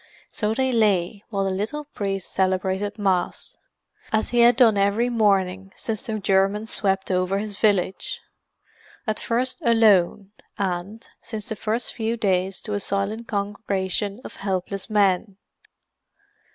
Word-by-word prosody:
So 215 Hz, +1 st, -1 dB
they 260 Hz, +1 st, +1 dB
lay 205 Hz, -3 st, +1 dB
while 200 Hz, -3 st, -1 dB
the 195 Hz, -, 0 dB
little 220 Hz, +11 st, -3 dB
priest 195 Hz, -8 st, -4 dB
celebrated 190 Hz, +2 st, 0 dB
Mass, 190 Hz, -4 st, -1 dB, 0.6 s
as 220 Hz, 0 st, +1 dB
he 240 Hz, -, +2 dB
had 235 Hz, 0 st, +7 dB
done 235 Hz, -4 st, +5 dB
every 200 Hz, +5 st, +2 dB
morning 195 Hz, -4 st, +1 dB
since 225 Hz, +3 st, -4 dB
the 220 Hz, -1 st, -2 dB
Germans 195 Hz, +2 st, +1 dB
swept 195 Hz, -1 st, 0 dB
over 185 Hz, +1 st, +1 dB
his 205 Hz, 0 st, -4 dB
village: 200 Hz, -3 st, +1 dB, 0.9 s
at 215 Hz, -1 st, -1 dB
first 250 Hz, +2 st, -1 dB
alone, 210 Hz, -4 st, +4 dB, 0.3 s
and, 195 Hz, +3 st, -3 dB
since 215 Hz, -2 st, -6 dB
the 220 Hz, -, -2 dB
first 225 Hz, +3 st, -2 dB
few 225 Hz, 0 st, -2 dB
days 190 Hz, -3 st, 0 dB
to 210 Hz, -, -4 dB
a 205 Hz, -, 0 dB
silent 200 Hz, +4 st, -2 dB
congregation 200 Hz, 0 st, -2 dB
of -, -, -9 dB
helpless 195 Hz, 0 st, -3 dB
men. 200 Hz, -1 st, +2 dB
205 Hz, 140 wpm, -24 LUFS, 190-220 Hz, 0.9 s, had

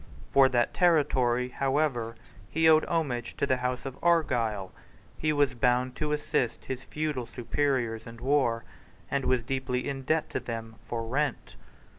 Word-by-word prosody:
For 135 Hz, -1 st, +6 dB
that 120 Hz, -2 st, +1 dB
territory, 130 Hz, -8 st, +3 dB
however, 135 Hz, -4 st, 0 dB, 0.3 s
he 160 Hz, +1 st, +3 dB
owed 155 Hz, 0 st, +6 dB
homage 125 Hz, -8 st, -2 dB
to -, -, +1 dB
the 130 Hz, -2 st, +2 dB
House 125 Hz, +1 st, -2 dB
of 135 Hz, -1 st, -6 dB
Argyle. 120 Hz, -, +1 dB, 0.4 s
He 155 Hz, -, 0 dB
was 145 Hz, -3 st, +2 dB
bound 125 Hz, +1 st, +1 dB
to 150 Hz, 0 st, -1 dB
assist 150 Hz, -4 st, -1 dB
his 130 Hz, 0 st, -5 dB
feudal 150 Hz, -6 st, -3 dB
superiors 120 Hz, -2 st, -1 dB
in 115 Hz, 0 st, -9 dB
war, 125 Hz, -3 st, +1 dB, 0.5 s
and 140 Hz, -1 st, 0 dB
was 130 Hz, -2 st, +2 dB
deeply 130 Hz, 0 st, -2 dB
in 135 Hz, -1 st, -3 dB
debt 155 Hz, +4 st, +1 dB
to -, -, -1 dB
them 115 Hz, -1 st, -6 dB
for 115 Hz, -1 st, -3 dB
rent. 140 Hz, +5 st, -2 dB
130 Hz, 155 wpm, -28 LUFS, 120-145 Hz, 0.5 s, For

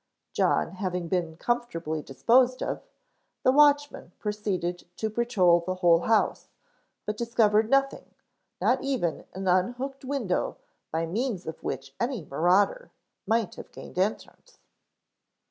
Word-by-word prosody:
John -, -, +1 dB
having 180 Hz, -3 st, -2 dB
been 170 Hz, -4 st, -1 dB
comfortably 170 Hz, -10 st, -2 dB
disposed 245 Hz, -, +2 dB
of, -, -, -3 dB, 0.6 s
the 255 Hz, -, +5 dB
watchman 290 Hz, -, +3 dB
proceeded 195 Hz, -5 st, -3 dB
to 220 Hz, -1 st, -2 dB
patrol 200 Hz, -7 st, +3 dB
the 185 Hz, +2 st, -3 dB
whole 175 Hz, -2 st, +4 dB
house, 220 Hz, +5 st, +1 dB, 0.6 s
but 210 Hz, -, -2 dB
discovered 220 Hz, -1 st, +2 dB
nothing, 275 Hz, +1 st, 0 dB, 0.4 s
not 255 Hz, +1 st, +2 dB
even 255 Hz, -, -1 dB
an 190 Hz, 0 st, -4 dB
unhooked 245 Hz, +10 st, 0 dB
window 260 Hz, -9 st, -1 dB, 0.3 s
by 165 Hz, +1 st, -1 dB
means 210 Hz, +2 st, -2 dB
of 160 Hz, -, -7 dB
which 135 Hz, +1 st, -5 dB
any 235 Hz, -, -2 dB
marauder 185 Hz, -, +2 dB, 0.4 s
might 225 Hz, -3 st, +1 dB
have -, -, -10 dB
gained -, -, -8 dB
entrance. 215 Hz, -, -3 dB
210 Hz, 125 wpm, -27 LUFS, 175-245 Hz, 0.6 s, the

